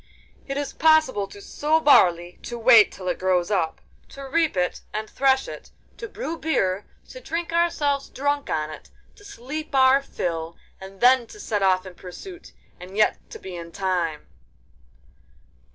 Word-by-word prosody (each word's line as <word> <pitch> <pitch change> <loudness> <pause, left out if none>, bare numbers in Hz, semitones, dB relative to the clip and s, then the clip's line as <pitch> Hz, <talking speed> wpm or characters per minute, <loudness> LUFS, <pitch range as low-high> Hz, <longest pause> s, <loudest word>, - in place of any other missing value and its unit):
'It 275 0 -3
is 285 -1 -3
possible 315 -10 +3
to 200 - -13
sow 300 +9 0
barley, 175 - +4
to 240 - -6
wait 230 -2 +6
till 185 - -9
it 180 - -1
grows 185 0 +1
up, 175 -5 0 0.3
to 275 - -10
reap 320 - +1
it 180 0 -1
and 215 +1 -4
thresh 265 +1 +1
it, - - -9 0.3
to 455 - -8
brew 405 -6 -5
beer, 195 -11 0 0.2
to - - -10
drink 335 -6 -4
ourselves 295 -5 +1
drunk 285 +1 -2
on 155 -1 -2
it, 155 - -11 0.3
to 410 - -18
sleep 305 - -7
our 265 +1 +5
fill, 165 -10 -4 0.2
and 190 0 -12
then 250 -1 +5
to 420 - -13
set 210 - -2
off 185 -1 +2
in 185 - -9
pursuit—and 190 - -12
yet 215 - +3
to - - -9
be 190 -1 -9
in 170 -1 -8
time. 175 -5 -2
235 Hz, 165 wpm, -24 LUFS, 185-295 Hz, 0.3 s, wait